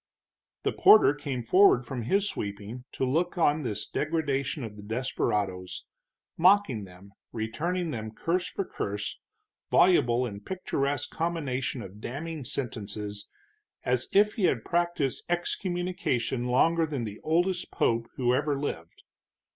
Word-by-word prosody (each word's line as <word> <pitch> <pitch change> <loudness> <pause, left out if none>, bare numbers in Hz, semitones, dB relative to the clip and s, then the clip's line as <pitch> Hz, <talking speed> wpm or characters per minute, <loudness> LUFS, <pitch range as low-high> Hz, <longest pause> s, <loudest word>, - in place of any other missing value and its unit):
The - - 0
porter 215 -9 +7
came 140 -4 -4
forward 155 - +5
from 125 0 -4
his 195 - +1
sweeping 105 - -5
to 130 - -1
look 170 +8 0
on 155 -2 +3
this 105 -6 -3
degradation 145 -3 -1
of 110 -2 -7
the 105 - -10
desperados, 105 -5 -2 0.5
mocking 180 - +4
them, 95 +2 -15 0.2
returning 160 +10 -2
them 110 -3 -4
curse 170 +11 -1
for 195 - -3
curse, 105 - -4 0.5
voluble 125 -9 +4
in 100 -4 -6
picturesque 145 - -2
combinations 135 -8 -2
of 100 +3 -12
damning 150 +5 -5
sentences 105 -5 -5 0.5
as 125 0 +1
if 210 +1 +4
he 205 - +1
had 120 -9 +1
practiced 170 -6 0
excommunication 175 - -1
longer 160 +7 +3
than 140 -5 -3
the 105 -2 -6
oldest 175 +3 +1
pope 115 0 0
who 125 -1 +2
ever 145 +1 +1
lived. 85 - -5
135 Hz, 130 wpm, -28 LUFS, 110-170 Hz, 0.5 s, porter